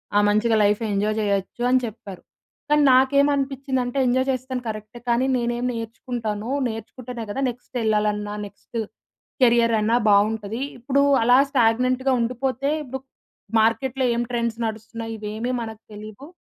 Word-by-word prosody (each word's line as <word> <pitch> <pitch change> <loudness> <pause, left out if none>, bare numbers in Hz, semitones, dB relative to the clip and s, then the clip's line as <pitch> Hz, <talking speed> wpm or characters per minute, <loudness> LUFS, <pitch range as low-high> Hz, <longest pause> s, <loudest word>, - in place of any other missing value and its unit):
ఆ! - - +6
మంచిగా 220 +2 +2
life 205 +2 +2
enjoy 210 +2 0
చేయొచ్చు" 200 +3 -1
అని 255 - +5
చెప్పారు. 215 -4 -9 0.5
కానీ 295 0 +4
నాకేం 280 +2 +4
అనిపించిందంటే, 270 -2 -2
ఎంజాయ్ 260 +2 +2
చేస్తాను 255 0 -4
కరెక్టే. 215 +2 -7
కానీ 235 +2 +2
నేనేం 240 +1 -1
నేర్చుకుంటానో, 225 0 -4 0.2
నేర్చుకుంటేనే 230 +1 -7
కదా! 270 - -3
నెక్స్ట్ 245 +1 -8
ఎళ్ళాలన్నా, 210 -1 0
నెక్స్ట్, 205 +3 -11 0.7
కెరియర్ 235 -1 +4
అన్నా 225 +3 +2
బాగుంటది. 210 +2 +2 0.2
ఇప్పుడు 275 +3 +2 0.2
అలా 245 +2 +6
స్టాగ్నెంట్‌గా 255 +1 +2
ఉండిపోతే 255 +3 -1
ఇప్పుడు 265 -1 -6 0.6
మార్కెట్‌లో 255 +4 +1
ఏం 235 - 0
ట్రెండ్స్ 235 -1 -1
నడుస్తున్నాయి 225 +1 -6
ఇవేమీ 215 +4 -3
మనకు 220 -1 -7
తెలియవు. 215 +6 -10
235 Hz, 130 wpm, -23 LUFS, 215-255 Hz, 0.7 s, ఆ